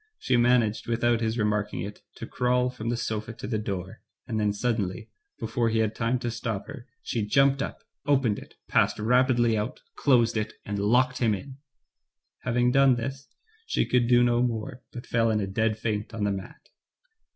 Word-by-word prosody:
She 130 Hz, -, 0 dB
managed, 120 Hz, -2 st, +2 dB
without 120 Hz, 0 st, +1 dB
his 110 Hz, +1 st, -1 dB
remarking 105 Hz, -2 st, 0 dB
it, 100 Hz, +3 st, -7 dB
to -, -, -7 dB
crawl 125 Hz, 0 st, +1 dB
from 115 Hz, -2 st, -5 dB
the 120 Hz, -, 0 dB
sofa 110 Hz, 0 st, -3 dB
to -, -, -9 dB
the 110 Hz, 0 st, -1 dB
door, 95 Hz, 0 st, -5 dB, 0.2 s
and 110 Hz, -3 st, -2 dB
then 105 Hz, -1 st, +2 dB
suddenly, 105 Hz, -3 st, -2 dB, 0.3 s
before 120 Hz, -3 st, 0 dB
he 110 Hz, -, 0 dB
had 110 Hz, -1 st, +1 dB
time 115 Hz, +2 st, 0 dB
to 120 Hz, -, -2 dB
stop 115 Hz, -3 st, -4 dB
her, 140 Hz, -4 st, -10 dB, 0.2 s
she 115 Hz, -, -2 dB
jumped 135 Hz, +5 st, +3 dB
up, -, -, -5 dB, 0.2 s
opened 130 Hz, -7 st, +2 dB
it, -, -, -14 dB
passed -, -, +2 dB
rapidly 120 Hz, +1 st, +3 dB
out, 105 Hz, +3 st, -3 dB, 0.2 s
closed 120 Hz, -5 st, +3 dB
it, 105 Hz, 0 st, -2 dB
and 105 Hz, -1 st, -3 dB
locked 125 Hz, +5 st, +2 dB
him 115 Hz, -4 st, +2 dB
in. 135 Hz, +6 st, -10 dB, 0.8 s
Having 125 Hz, 0 st, +1 dB
done 135 Hz, -1 st, +5 dB
this, 135 Hz, +3 st, -5 dB, 0.4 s
she -, -, +1 dB
could 125 Hz, -1 st, +2 dB
do 120 Hz, 0 st, +5 dB
no 120 Hz, 0 st, +3 dB
more, 125 Hz, +1 st, -2 dB
but 120 Hz, -, -8 dB
fell 115 Hz, -1 st, +1 dB
in 110 Hz, -1 st, +1 dB
a 100 Hz, -, -1 dB
dead 110 Hz, +3 st, 0 dB
faint 110 Hz, 0 st, -3 dB
on 110 Hz, -, -2 dB
the 100 Hz, -, +1 dB
mat. 95 Hz, -1 st, -8 dB
115 Hz, 190 wpm, -27 LUFS, 105-125 Hz, 0.8 s, done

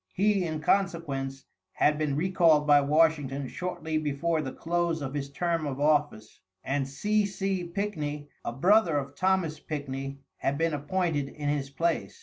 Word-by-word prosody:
He, 200 Hz, -1 st, +2 dB
in 155 Hz, -2 st, -3 dB
consequence, 145 Hz, -8 st, -1 dB, 0.3 s
had 150 Hz, 0 st, +2 dB
been 150 Hz, -3 st, 0 dB
recalled 165 Hz, -2 st, +3 dB
by 145 Hz, -1 st, +6 dB
Washington 145 Hz, -2 st, +2 dB
shortly 160 Hz, -1 st, -3 dB
before 155 Hz, +2 st, 0 dB
the 135 Hz, -3 st, -4 dB
close 170 Hz, +1 st, -1 dB
of 135 Hz, -2 st, -5 dB
his 140 Hz, -1 st, -3 dB
term 165 Hz, +1 st, -1 dB
of 135 Hz, -1 st, -4 dB
office, 145 Hz, -7 st, +1 dB, 0.2 s
and 135 Hz, 0 st, -1 dB
C. 210 Hz, +10 st, +1 dB
C. 195 Hz, -2 st, -2 dB
Pickney, 150 Hz, -7 st, -3 dB, 0.2 s
a -, -, -3 dB
brother 175 Hz, -, +4 dB
of 140 Hz, 0 st, -3 dB
Thomas 185 Hz, -4 st, +1 dB
Pickney, 135 Hz, -2 st, -5 dB, 0.2 s
had 140 Hz, +1 st, -1 dB
been 165 Hz, 0 st, +1 dB
appointed 150 Hz, -1 st, -1 dB
in 145 Hz, 0 st, -4 dB
his 145 Hz, -2 st, -1 dB
place. 165 Hz, +4 st, -1 dB
150 Hz, 155 wpm, -28 LUFS, 140-175 Hz, 0.3 s, by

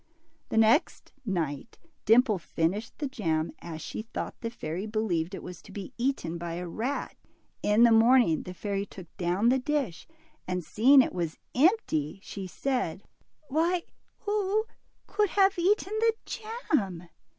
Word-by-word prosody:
The -, -, -2 dB
next 225 Hz, +8 st, +3 dB, 0.2 s
night 165 Hz, -1 st, -2 dB, 0.3 s
Dimple 225 Hz, -2 st, +5 dB
finished 170 Hz, +6 st, -2 dB
the 295 Hz, -, -2 dB
jam, 165 Hz, -, -1 dB
as 160 Hz, -2 st, -7 dB
she -, -, -5 dB
thought 225 Hz, -, -5 dB
the 230 Hz, -, -2 dB
fairy 190 Hz, -3 st, -5 dB
believed 195 Hz, -5 st, -1 dB
it -, -, -8 dB, 0.2 s
to 205 Hz, -, -13 dB
be 200 Hz, +6 st, -7 dB
eaten 235 Hz, -10 st, -1 dB
by 170 Hz, -1 st, -4 dB
a 175 Hz, +1 st, -4 dB
rat. 240 Hz, +11 st, -3 dB, 0.5 s
In 210 Hz, +3 st, +4 dB
the 235 Hz, -, +7 dB
morning 225 Hz, -6 st, +5 dB
the 180 Hz, -, -8 dB
fairy 200 Hz, +1 st, -2 dB
took 180 Hz, -4 st, -12 dB
down 185 Hz, +6 st, +2 dB
the 260 Hz, +1 st, +3 dB
dish, 260 Hz, -, -2 dB, 0.4 s
and 180 Hz, -1 st, -2 dB
seeing 260 Hz, -, +6 dB
it -, -, -4 dB
was 170 Hz, -3 st, -3 dB, 0.2 s
empty, 245 Hz, -, +2 dB
she 195 Hz, -2 st, -6 dB
said, 230 Hz, -4 st, -2 dB, 0.4 s
Why, 335 Hz, +5 st, +1 dB, 0.4 s
who 420 Hz, +1 st, 0 dB, 0.4 s
could 420 Hz, -2 st, +1 dB
have 390 Hz, -1 st, +3 dB
eaten 395 Hz, +3 st, +2 dB
the 455 Hz, 0 st, +4 dB
jam 300 Hz, -, -2 dB
220 Hz, 150 wpm, -28 LUFS, 175-280 Hz, 0.5 s, the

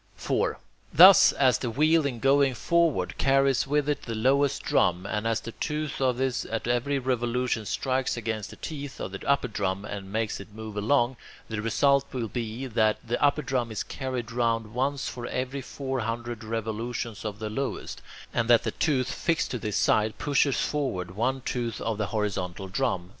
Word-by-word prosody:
4. -, -, -1 dB, 0.3 s
Thus, 185 Hz, +3 st, +9 dB
as 130 Hz, -3 st, +3 dB
the 125 Hz, -, -2 dB
wheel 155 Hz, +5 st, +3 dB
in 125 Hz, -4 st, -4 dB
going 135 Hz, +2 st, +3 dB
forward 170 Hz, +4 st, +1 dB
carries 135 Hz, -1 st, +3 dB
with 145 Hz, 0 st, +1 dB
it 150 Hz, -, 0 dB
the 115 Hz, -, -5 dB
lowest 140 Hz, +4 st, +2 dB
drum, 90 Hz, 0 st, +2 dB
and 110 Hz, +1 st, -2 dB
as 115 Hz, 0 st, 0 dB
the 115 Hz, -, -7 dB
tooth 150 Hz, +2 st, -3 dB
of 130 Hz, -2 st, +2 dB
this 130 Hz, -1 st, 0 dB
at 115 Hz, 0 st, -3 dB
every 120 Hz, +4 st, +1 dB
revolution 125 Hz, -3 st, -1 dB
strikes 130 Hz, +7 st, -1 dB
against 110 Hz, -2 st, -3 dB
the -, -, -10 dB
teeth 145 Hz, -3 st, -7 dB
of 95 Hz, -, -4 dB
the 95 Hz, -, -7 dB
upper 140 Hz, -2 st, +3 dB
drum, 100 Hz, -2 st, -2 dB
and 100 Hz, -2 st, -6 dB
makes 110 Hz, 0 st, -1 dB
it 100 Hz, +1 st, -12 dB
move 110 Hz, -1 st, -7 dB
along, 120 Hz, +4 st, +2 dB, 0.3 s
the 110 Hz, -1 st, -3 dB
result 140 Hz, +5 st, +2 dB
will 120 Hz, -3 st, -2 dB
be 115 Hz, +2 st, -4 dB
that 110 Hz, -3 st, +2 dB
the 120 Hz, +4 st, -1 dB
upper 145 Hz, +1 st, +3 dB
drum 125 Hz, -3 st, -1 dB
is 110 Hz, -, -2 dB
carried 130 Hz, -4 st, -4 dB
round 115 Hz, -2 st, 0 dB
once 135 Hz, +3 st, -1 dB
for 120 Hz, -1 st, -5 dB
every 130 Hz, +2 st, -3 dB
four 135 Hz, 0 st, -4 dB
hundred 120 Hz, 0 st, -4 dB
revolutions 115 Hz, +1 st, -4 dB
of 105 Hz, -2 st, -4 dB
the 110 Hz, 0 st, -5 dB
lowest, 135 Hz, +4 st, -4 dB, 0.3 s
and 120 Hz, -1 st, 0 dB
that 120 Hz, -1 st, +6 dB
the -, -, -1 dB
tooth 135 Hz, -6 st, 0 dB
fixed 165 Hz, -1 st, 0 dB
to 125 Hz, -, -1 dB
its 105 Hz, -, -1 dB
side 110 Hz, 0 st, +2 dB
pushes 140 Hz, -1 st, +2 dB
forward 125 Hz, -, -2 dB
one 130 Hz, +7 st, -1 dB
tooth 120 Hz, -2 st, -3 dB
of 110 Hz, -2 st, -2 dB
the 105 Hz, -, 0 dB
horizontal 95 Hz, -2 st, -2 dB
drum. 95 Hz, -1 st, -1 dB
120 Hz, 185 wpm, -27 LUFS, 110-135 Hz, 0.3 s, Thus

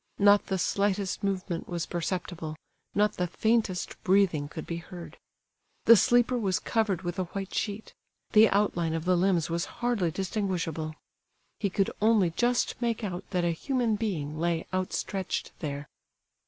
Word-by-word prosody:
Not 205 Hz, 0 st, +5 dB
the 190 Hz, -, 0 dB
slightest 200 Hz, +1 st, 0 dB
movement 185 Hz, -3 st, -2 dB
was 170 Hz, -2 st, -2 dB
perceptible, 175 Hz, -2 st, -3 dB, 0.4 s
not 210 Hz, 0 st, +2 dB
the 180 Hz, -, 0 dB
faintest 215 Hz, -1 st, 0 dB
breathing 185 Hz, -7 st, +3 dB
could 160 Hz, -, -7 dB
be 170 Hz, -, -4 dB
heard. 170 Hz, 0 st, -9 dB, 0.7 s
The 230 Hz, -, +10 dB
sleeper 245 Hz, +2 st, +3 dB
was 190 Hz, -5 st, +1 dB
covered 210 Hz, -6 st, 0 dB
with 175 Hz, +1 st, -3 dB
a 185 Hz, -, 0 dB
white 195 Hz, +2 st, -6 dB
sheet; 210 Hz, 0 st, -3 dB, 0.4 s
the 220 Hz, 0 st, +7 dB
outline 175 Hz, -5 st, +1 dB
of 165 Hz, 0 st, -3 dB
the 185 Hz, 0 st, +4 dB
limbs 175 Hz, -2 st, +2 dB
was 170 Hz, 0 st, 0 dB
hardly 240 Hz, -8 st, +1 dB
distinguishable. 170 Hz, -4 st, -2 dB, 0.6 s
He 200 Hz, -, 0 dB
could 195 Hz, +1 st, 0 dB
only 210 Hz, -5 st, +4 dB
just 240 Hz, +7 st, 0 dB
make 235 Hz, -1 st, -1 dB
out 185 Hz, -2 st, -4 dB
that 180 Hz, -3 st, 0 dB
a 170 Hz, -, +2 dB
human 240 Hz, -, 0 dB
being 155 Hz, -9 st, -3 dB
lay 170 Hz, 0 st, 0 dB
outstretched 185 Hz, 0 st, -2 dB
there. 145 Hz, -2 st, -4 dB
190 Hz, 155 wpm, -28 LUFS, 170-210 Hz, 0.7 s, The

